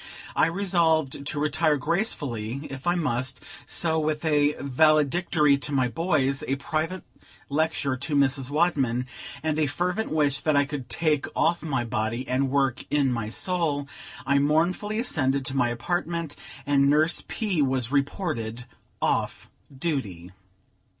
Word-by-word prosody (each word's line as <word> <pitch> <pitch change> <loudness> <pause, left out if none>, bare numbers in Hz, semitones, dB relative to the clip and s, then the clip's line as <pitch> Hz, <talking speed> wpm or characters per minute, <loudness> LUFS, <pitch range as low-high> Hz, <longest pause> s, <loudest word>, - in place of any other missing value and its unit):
I - - +4
resolved 165 -6 +1
to 145 - -1
retire 150 +1 +2
gracefully, 140 - -2
if 135 +3 -7
I 175 - +3
must; 130 -6 -1 0.3
so, 160 -2 0
with 155 +1 -1
a 150 -1 +3
valedictory 150 +1 +3
to 150 - -4
my 130 -3 +2
boys, 140 -3 0
a 135 - +1
private 160 +5 -3 0.5
lecture 145 -2 0
to 145 +4 -2
Mrs. 135 -1 +2
Wadman, 140 -6 +1 0.4
and 155 -1 0
a 155 - +2
fervent 180 +9 -1
wish 145 -3 +1
that 155 -2 +1
I 145 0 +4
could 140 -3 -6
take 155 -3 0
off 170 +1 +2
my 140 -6 -1
body 115 +2 -2
and 130 +1 +1
work 135 -2 +1
in 140 -3 +2
my 115 -3 -3
soul, 150 -1 -1 0.4
I 140 +1 +3
mournfully 170 +8 +1
ascended 140 - 0
to 130 - -4
my 125 -3 +2
apartment, 165 +5 -2 0.3
and 140 -1 +3
Nurse 155 +4 +3
P. 200 -8 -1
was 130 -3 0
reported 135 - -2 0.4
off - - -1 0.2
duty. 130 - -3
145 Hz, 145 wpm, -26 LUFS, 135-160 Hz, 0.5 s, I